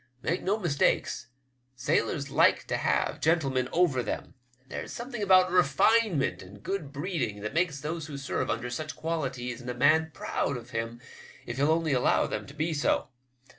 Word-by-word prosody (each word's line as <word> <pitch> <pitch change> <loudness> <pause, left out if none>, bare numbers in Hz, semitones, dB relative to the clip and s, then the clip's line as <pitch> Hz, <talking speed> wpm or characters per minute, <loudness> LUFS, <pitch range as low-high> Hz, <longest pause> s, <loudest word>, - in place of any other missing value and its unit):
Make 170 +3 0
no 200 +3 +1
mistake, 170 -9 +2 0.7
sailors 130 +2 0
like - - +4
to - - -1
have - - 0
gentlemen 135 -6 +2
over 165 -8 +3
them. - - -4 0.3
There's - - -6
a - - -7
something 240 -1 -5
about 185 -2 +5
refine 185 +6 +4
ment 90 -10 -1
and 100 +3 -13
good 185 -8 -3
breeding 145 - -3
that 105 +3 -4
makes 165 -3 +1
those 155 +1 -4
who 145 -2 -6
serve 135 0 -2
under 125 +1 -2
such 155 +5 -4
qualities 130 -7 -3
in 125 - -7
a 125 - -3
man 155 +5 +4
proud 140 -2 -2
of 120 +1 -11
him 115 0 -3 0.5
if 120 - -5
he'll 145 +2 +3
only 160 -2 +2
allow 125 - +3
them - - -4
to 140 - -11
be 160 +2 -1
so. 145 -3 +1
145 Hz, 180 wpm, -28 LUFS, 125-165 Hz, 0.7 s, about